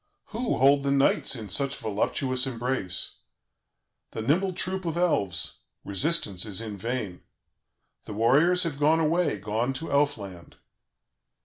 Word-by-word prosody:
Who 235 +2 -1
hold 140 +2 +5
the 140 - -1
knights 140 0 +2
in 110 -4 -6
such 140 +8 +1
voluptuous 130 +5 -1
embrace? 120 -7 -2 1.0
The 110 - -4
nimble 180 - +1
troop 190 +2 -3
of 165 0 -2
Elves; 100 - 0 0.3
resistance 100 - +1
is 105 -3 0
in 110 -2 -4
vain. 105 -3 -4 0.8
The - - -7
warriors 145 - +3
have 155 -5 -3
gone 155 +2 +3
away, 165 -4 +1
gone 110 +6 -2
to 160 +5 -5
Elfland. 110 -12 -1
135 Hz, 130 wpm, -26 LUFS, 105-160 Hz, 1.0 s, hold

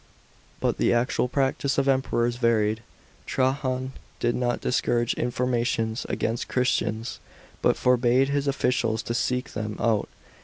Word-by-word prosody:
But - - 0
the - - +3
actual 120 +1 +1
practice 135 +1 0
of 140 0 +2
Emperors 120 -3 +1
varied. 110 -2 +2 0.5
Trajan 130 -1 0 0.3
did 120 0 +1
not 120 0 0
discourage 120 -1 +1
informa 120 0 0
tions 115 -1 -1
against 115 +1 -1
Christians; 115 -3 -1 0.4
but - - +3
forbade 125 +1 +3
his 140 0 0
officials 120 -5 0
to 115 - -3
seek 125 +2 -1
them 110 -1 -4
out. 110 -3 +1
120 Hz, 130 wpm, -26 LUFS, 115-130 Hz, 0.5 s, the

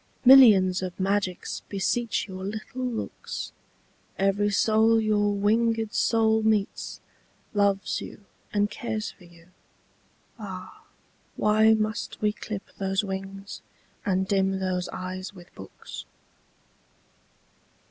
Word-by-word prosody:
Millions 210 -9 +8
of 185 0 -5
magics 190 -1 -1
beseech 215 +2 -1
your 190 -1 -7
little 215 +5 -5
looks; 245 -3 -4 0.7
Every 195 +1 +2
soul 220 +2 +3
your 210 -1 +2
winged 225 +2 +1
soul 220 -1 +3
meets, 215 -2 0 0.5
loves 200 -2 +1
you 200 - -10 0.3
and 205 0 +2
cares 225 -3 -4
for 180 - -19
you. 170 0 -19 0.9
Ah! 190 -3 -9 0.5
why 220 +1 +4
must 215 0 -3
we 210 -1 +1
clip 210 -2 -6 0.2
those 195 +1 0
wings 195 0 -6 0.4
and 190 -2 0
dim 195 -1 +1
those 185 -1 -2
eyes 185 +2 -6
with 175 -2 -15
books? 95 - -10
205 Hz, 105 wpm, -26 LUFS, 190-220 Hz, 0.9 s, Millions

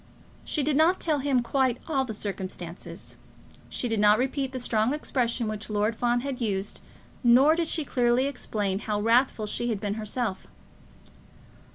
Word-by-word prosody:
She 300 - -1
did 295 +1 +1
not 335 +4 +4
tell 310 -3 +1
him 265 -3 +1
quite 260 -1 +1
all 275 -5 +1
the 225 - -5
circumstances. 185 -4 -6 0.5
She 245 - -2
did 225 -2 -1
not 210 0 +6
repeat 265 +2 -1
the 260 - -5
strong 235 +1 0
expressions 245 -5 -1
which 215 0 -5
Lord 210 +1 0
Fawn 240 +1 +1
had 270 -1 -4
used, 200 -3 -2 0.4
nor 255 +6 +6
did 335 0 0
she 315 -2 0
clearly 245 0 +2
explain 210 -8 -2
how 210 -1 -2
wrathful 230 +1 +2
she 240 +3 -2
had 220 -4 -1
been 205 0 -2
herself. 215 -2 -3
240 Hz, 165 wpm, -27 LUFS, 210-270 Hz, 0.5 s, not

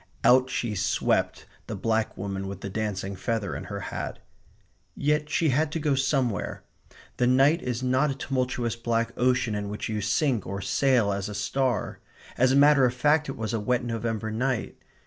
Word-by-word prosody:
Out 130 +1 +5
she 120 -3 -2
swept, 100 - 0 0.2
the - - -4
black 110 -1 -1
woman 95 0 -4
with 95 -1 -7
the 100 - -5
dancing 100 -2 -3
feather 105 +1 -2
in - - -6
her - - -5
hat. - - -4 0.8
Yet 150 +1 0
she 160 0 +2
had 150 +3 +1
to 165 - -1
go 150 -2 +1
somewhere. 135 -6 0 0.5
The 125 - +2
night 135 +7 +4
is 125 0 -3
not 130 +4 +2
a 135 - -2
tumultuous 125 -4 -2
black 115 0 -1
ocean 125 -2 +1
in 105 -1 -3
which 105 +2 -4
you 105 -1 -2
sink 115 - 0
or 100 +1 -4
sail 120 0 +2
as 100 +1 -3
a 105 - -6
star. 125 +5 -1 0.4
As 130 +1 +3
a - - +3
matter 145 -1 +6
of 125 0 0
fact 150 +3 +2
it 135 - -5
was 110 0 -3
a 115 - 0
wet 120 +4 0
November 115 -2 -3
night. 125 +1 -2
120 Hz, 185 wpm, -26 LUFS, 105-135 Hz, 0.8 s, matter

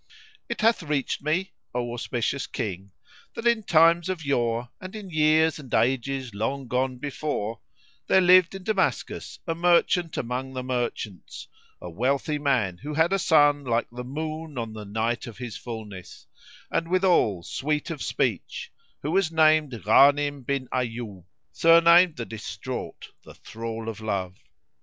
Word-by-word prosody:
It - - -3
hath 225 -1 +3
reached 150 -4 -2
me, 170 +6 -1 0.2
O 120 -1 -2
auspicious 120 +2 -2
King, 100 -5 -5 0.5
that 230 - -6
in 235 -2 +3
times 170 -1 +4
of 175 -5 -4
yore 120 -3 0
and 185 +3 -8
in 200 -4 -8
years 155 0 +3
and 135 -4 -12
ages 130 0 0
long 130 +6 -3
gone 130 +1 -1
before, 140 -5 -3 0.5
there 190 - +5
lived 185 0 +5
in 195 - -8
Damascus 195 -1 -1
a 165 - -1
merchant 175 0 +2
among 130 +2 -3
the 130 -1 -4
merchants, 120 -7 -4 0.3
a - - -8
wealthy 135 - -1
man 120 -11 0
who 150 +1 -6
had 160 +4 +3
a 195 - +2
son 145 -4 +4
like 120 -2 0
the 125 +1 -7
moon 155 +2 -5
on 115 -2 -4
the 105 -1 -8
night 110 +4 -2
of 115 - -10
his 120 -4 -6
fulness[FN#80] 105 -6 -9 0.5
and 165 - 0
withal 175 - +2
sweet 150 - -2
of 150 -5 -6
speech, - - -2 0.3
who 150 - -2
was 185 -2 +2
named 155 -3 +4
Ghánim 140 +6 +4
bin 135 0 -2
'Ayyúb 115 -7 -4 0.3
surnamed 170 +1 +6
the 115 - -5
Distraught, 110 +3 -7
the - - -14
Thrall 115 0 -7
o' 115 - -2
Love. 95 -4 -2
135 Hz, 150 wpm, -25 LUFS, 115-160 Hz, 0.5 s, surnamed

